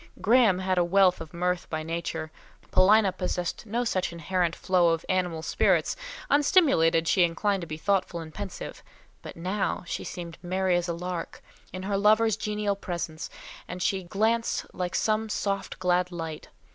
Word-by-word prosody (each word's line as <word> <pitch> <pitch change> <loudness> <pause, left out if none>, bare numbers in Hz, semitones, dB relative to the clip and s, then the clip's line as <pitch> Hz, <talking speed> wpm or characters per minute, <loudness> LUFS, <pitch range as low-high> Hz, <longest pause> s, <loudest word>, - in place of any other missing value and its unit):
Graham 225 -4 +4
had 185 -1 0
wealth 185 +1 +4
of 160 - -8
mirth 180 +1 -1
by 155 -1 -3
nature; 165 -1 -4 0.4
Paulina 200 +2 +5
possessed 180 +2 -3
no 235 +4 0
such 185 -7 -1
inherent 170 +1 -1
flow 180 -2 +3
of 165 0 -1
animal 180 -4 0
spirits—unstimulated, 285 - +2
she 185 - +3
inclined 190 +4 +1
to 170 - -6
be 155 -1 -5
thoughtful 185 -1 0
and 160 -1 -9
pensive—but 200 -3 -9
now 185 +4 -2
she - - -4
seemed 170 -2 -7
merry 185 0 +1
as 175 0 0
a 170 - -1
lark; 175 0 -5 0.3
in 185 0 -6
her 195 0 -1
lover's 215 +1 +4
genial 210 -1 -1
presence, 170 -4 -5 0.5
she 190 +2 0
glanced 220 +6 0
like 180 -1 -3
some 220 0 +1
soft 200 -1 -2
glad 180 0 +1
light. 165 -3 -6
185 Hz, 150 wpm, -27 LUFS, 170-205 Hz, 0.5 s, Paulina